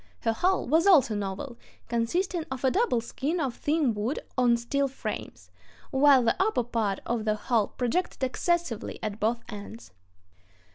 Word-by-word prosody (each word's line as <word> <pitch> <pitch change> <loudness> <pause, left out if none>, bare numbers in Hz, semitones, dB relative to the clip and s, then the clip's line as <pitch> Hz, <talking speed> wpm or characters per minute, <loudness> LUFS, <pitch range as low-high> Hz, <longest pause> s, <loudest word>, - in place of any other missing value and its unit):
Her 225 - +1
hull 370 +11 +1
was 325 +8 +3
also 285 - +6
novel, 205 +5 -4 0.3
consisting 330 +10 -1
of 265 -1 -5
a 260 - +3
double 395 - +1
skin 285 +8 -3
of 270 -6 -1
thin 295 -5 +1
wood 215 +7 -2 0.2
on 245 -2 +4
steel 275 +4 0
frames, 270 - -7 0.4
while 270 -2 +5
the 230 - +2
upper 390 - +2
part 225 -4 -1
of 235 -2 -1
the 215 -1 +1
hull 220 -1 +1
projected 265 +5 -2
excessively 335 -1 -1
at 215 0 -3
both 230 +2 0
ends. 210 - -9
245 Hz, 155 wpm, -27 LUFS, 225-300 Hz, 0.4 s, also